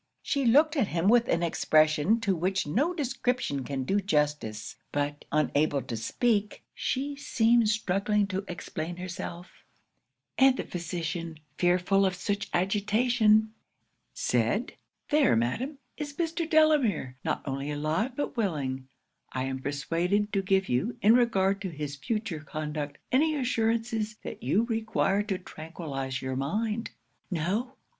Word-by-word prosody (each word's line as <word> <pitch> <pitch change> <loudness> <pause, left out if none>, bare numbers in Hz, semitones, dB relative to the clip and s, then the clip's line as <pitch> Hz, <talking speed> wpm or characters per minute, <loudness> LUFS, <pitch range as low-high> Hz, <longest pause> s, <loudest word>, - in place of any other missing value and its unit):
'She 280 -2 0
looked 300 +7 +5
at 260 -9 +2
him 170 +1 0
with 235 +2 +5
an 170 +1 +1
expression 155 +4 +3
to 205 -4 +1
which 185 +3 0
no 250 - +1
description 250 - -1
can 135 0 -3
do 195 +10 +1
justice; 150 - -1 0.2
but 145 0 -2
unable 150 -1 +2
to 125 -2 -5
speak, 210 - 0
she 280 +2 -2
seemed 235 -4 +3
struggling 210 0 +1
to 195 0 -3
explain 175 -1 -5
herself; 175 0 -7 0.8
and 265 -1 +6
the - - -2
physician, 170 -2 -4 0.2
fearful 180 +2 +3
of 190 -1 +1
such 200 +2 -2
agitation, 215 +3 +3 0.6
said - - 0 0.4
"There, 295 - +4
madam, 235 - -1 0.2
is 290 -1 -5
Mr. 330 -1 -1
Delamere; 285 - +3
not - - -1
only 135 +1 -3
alive, 155 - -1
but 290 0 -3
willing, 140 - -2 0.4
I 130 - -2
am 130 0 -3
persuaded, 170 +9 0
to 195 - +2
give 190 0 +1
you, 165 - 0
in 215 +3 +7
regard 200 -5 +3
to 190 - -3
his 150 -3 -5
future 215 - -3
conduct, 150 -1 -5
any 310 +4 +3
assurances 225 -4 0
that - - -7
you 180 - +2
require 220 -3 0
to 205 -2 -2
tranquillise 150 -7 -6
your 130 0 -2
mind." 210 - -1 0.4
'"No!" 205 - -1
195 Hz, 135 wpm, -28 LUFS, 155-230 Hz, 0.8 s, in